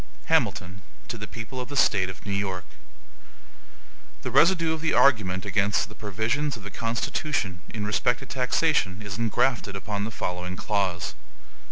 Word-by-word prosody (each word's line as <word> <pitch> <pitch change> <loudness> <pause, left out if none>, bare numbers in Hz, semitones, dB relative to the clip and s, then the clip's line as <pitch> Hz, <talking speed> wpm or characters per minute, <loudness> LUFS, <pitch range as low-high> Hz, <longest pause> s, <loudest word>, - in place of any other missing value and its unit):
HAMILTON 90 +2 +1 0.3
To 115 - -3
the 110 - -5
People 125 +3 -6
of 125 - -6
the 145 - -5
State 95 -8 +4
of 95 - -9
New 100 - -3
York: 95 -2 -1 1.6
THE - - -3
residue 165 -1 +5
of 160 - -4
the 160 - +1
argument 100 -8 +4
against 105 +3 +1
the - - -11
provisions 115 +7 -1
of 105 - -12
the 105 - -7
Constitution 115 - -1
in 105 -2 -4
respect 120 +3 +2
to - - -7
taxation 125 - +1
is 105 +1 -5
ingrafted 115 -2 +1
upon 100 +1 -3
the 110 - -2
following 90 -4 -3
clause. 95 -4 -1
105 Hz, 160 wpm, -26 LUFS, 95-125 Hz, 1.6 s, residue